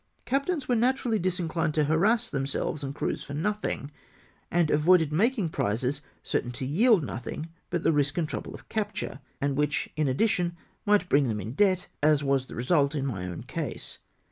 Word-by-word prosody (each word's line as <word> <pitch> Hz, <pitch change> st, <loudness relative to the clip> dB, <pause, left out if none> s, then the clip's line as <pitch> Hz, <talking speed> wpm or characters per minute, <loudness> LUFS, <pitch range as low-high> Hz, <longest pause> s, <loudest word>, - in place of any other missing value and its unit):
Captains 280 Hz, +3 st, 0 dB
were 245 Hz, -, +2 dB
naturally 240 Hz, -1 st, +1 dB
disinclined 170 Hz, -3 st, -1 dB
to 155 Hz, -, +3 dB
harass 200 Hz, +10 st, +3 dB
themselves 140 Hz, 0 st, -2 dB
and 135 Hz, 0 st, -4 dB
crews -, -, -2 dB
for 140 Hz, -, -7 dB
nothing, 190 Hz, -4 st, -2 dB, 0.6 s
and 170 Hz, -3 st, +2 dB
avoided 160 Hz, 0 st, +4 dB
making 215 Hz, -, +2 dB
prizes 125 Hz, +3 st, -1 dB, 0.2 s
certain 120 Hz, -, -1 dB
to 130 Hz, +2 st, -4 dB
yield 195 Hz, -, +4 dB
nothing 130 Hz, +5 st, -5 dB, 0.2 s
but 175 Hz, -2 st, -1 dB
the -, -, +4 dB
risk 145 Hz, +1 st, +1 dB
and 165 Hz, -3 st, +1 dB
trouble -, -, -5 dB
of -, -, -14 dB
capture, 210 Hz, -9 st, -3 dB, 0.2 s
and 140 Hz, -1 st, 0 dB
which, 150 Hz, 0 st, 0 dB
in 155 Hz, -2 st, +1 dB
addition, 175 Hz, -, +1 dB, 0.3 s
might 205 Hz, -3 st, +4 dB
bring 140 Hz, -4 st, +3 dB
them 110 Hz, -2 st, -1 dB
in 105 Hz, +3 st, -5 dB
debt, 185 Hz, +4 st, +2 dB, 0.2 s
as 150 Hz, -1 st, +4 dB
was 135 Hz, -2 st, +1 dB
the -, -, -9 dB
result 140 Hz, +3 st, +2 dB
in 140 Hz, -2 st, -1 dB
my 95 Hz, -9 st, -3 dB
own 90 Hz, -2 st, -6 dB
case. -, -, -5 dB
155 Hz, 180 wpm, -28 LUFS, 140-200 Hz, 0.6 s, avoided